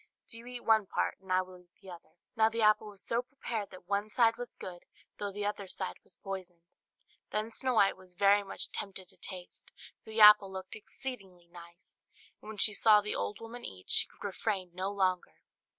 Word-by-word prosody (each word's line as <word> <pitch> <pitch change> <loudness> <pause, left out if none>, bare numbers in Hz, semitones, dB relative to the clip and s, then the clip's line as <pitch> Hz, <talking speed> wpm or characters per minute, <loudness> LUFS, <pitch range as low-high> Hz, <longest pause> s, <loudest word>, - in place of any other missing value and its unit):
do 230 - -3
you 235 - -12
eat 250 -1 -7
one 220 -3 +4
part, - - -1
and 190 -1 -9
I 185 0 +4
will 185 0 -13
eat 180 -1 -23
the 190 - -11
other." 170 -2 -13 0.2
Now 220 0 +5
the 225 0 -1
apple 215 0 +4
was 200 -2 -7
so 230 +1 +1
prepared 245 -5 -5
that 185 -2 -13
one 200 +2 0
side 230 0 +4
was 245 0 -7
good, 175 -2 -9 0.3
though 205 -1 -3
the 205 +1 -4
other 205 -1 -3
side 185 0 -4
was - - -22
poisoned. 185 -3 -6 0.7
Then 215 +2 -1
Snow 255 +2 +1
White 200 -3 +5
was 185 -1 -16
very 200 +2 +5
much 195 - -6
tempted 190 -2 -5
to - - -18
taste, 180 -2 -9 0.3
for - - -14
the 220 +1 -3
apple 210 -2 +9
looked 190 0 -7
exceedingly 200 -5 -7
nice; 170 +1 -14 0.4
and - - -11
when 220 - -7
she 210 +1 +3
saw 210 +1 +6
the 210 - -3
old 100 +1 -3
woman 235 +2 -8
eat, 95 -1 -8
she - - +4
could - - -16
refrain 195 -2 -2
no 185 +2 -2
longer. 185 -3 -1
200 Hz, 215 wpm, -32 LUFS, 185-220 Hz, 0.7 s, apple